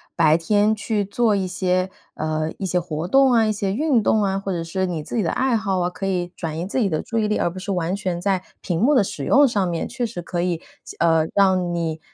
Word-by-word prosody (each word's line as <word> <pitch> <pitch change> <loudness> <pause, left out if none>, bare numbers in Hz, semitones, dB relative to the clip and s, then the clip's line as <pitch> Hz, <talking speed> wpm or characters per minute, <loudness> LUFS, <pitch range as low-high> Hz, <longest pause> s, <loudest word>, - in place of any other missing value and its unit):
白 155 -3 +4
天 205 +5 +2
去 210 -1 -1
做 215 +2 +1
一 195 -1 0
些， 185 0 0 0.3
呃， 155 0 -2
一 195 - -4
些 180 -1 +1
活 165 -1 -4
动 270 +5 +5
啊、 225 -2 +4
一 215 - +1
些 200 -2 -2
运 275 0 +2
动 215 +1 +2
啊， 195 -1 0
或 195 0 -4
者 170 -2 -2
是 190 +3 -2
你 165 -4 -3
自 - - -6
己 225 - +2
的 170 - 0
爱 260 -2 +1
好 200 -4 0
啊， 175 0 0
可 180 +2 -5
以 180 -2 -1
转 160 -2 -4
移 170 - -3
自 210 - -2
己 210 -5 +2
的 155 -3 -1
注 230 - -4
意 215 - +1
力， 210 - 0
而 - - +1
不 185 +2 -8
是 200 - -4
完 180 0 -1
全 185 -4 -3
在 190 0 0 0.2
屏 170 -3 -2
幕 285 +5 +4
的 235 - +5
使 205 +2 -5
用 285 0 +5
上 200 -6 0
面， 170 -1 -2
确 245 -1 -3
实 215 -6 -5
可 170 +1 -3
以， 175 -1 0
就 - - -15
呃， 165 -1 +3
让 185 -3 +3
你 165 -2 -2
190 Hz, 285 characters per minute, -22 LUFS, 175-210 Hz, 0.3 s, 动